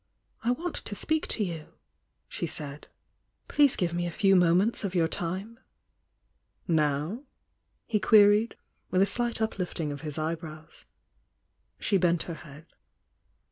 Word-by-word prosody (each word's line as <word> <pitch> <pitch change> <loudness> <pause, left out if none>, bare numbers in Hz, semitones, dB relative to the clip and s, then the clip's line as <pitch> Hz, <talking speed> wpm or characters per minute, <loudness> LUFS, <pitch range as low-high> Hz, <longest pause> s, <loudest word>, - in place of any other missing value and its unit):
"I 235 - +1
want 325 +7 -2
to 205 - -5
speak 315 +8 0
to 215 - +1
you," 165 -5 -6 0.5
she - - -3
said. 145 0 -5 0.6
"Please 285 -3 +4
give 170 -2 -1
me 175 0 -1
a - - -4
few 195 +2 +3
moments 180 +6 +3
of 190 -2 -3
your 165 -2 +3
time." 190 +8 -3 1.1
"Now?" 155 - 0 0.6
he 215 -2 0
queried, 210 +2 +5 0.3
with 185 +1 +3
a - - +4
slight 235 +3 -1
uplifting 180 -7 -2
of 145 - -6
his 150 -3 -4
eyebrows. 160 0 -6 0.9
She 200 - +2
bent 170 -2 +2
her 170 - -6
head. 150 +1 -13
180 Hz, 140 wpm, -28 LUFS, 160-215 Hz, 1.1 s, queried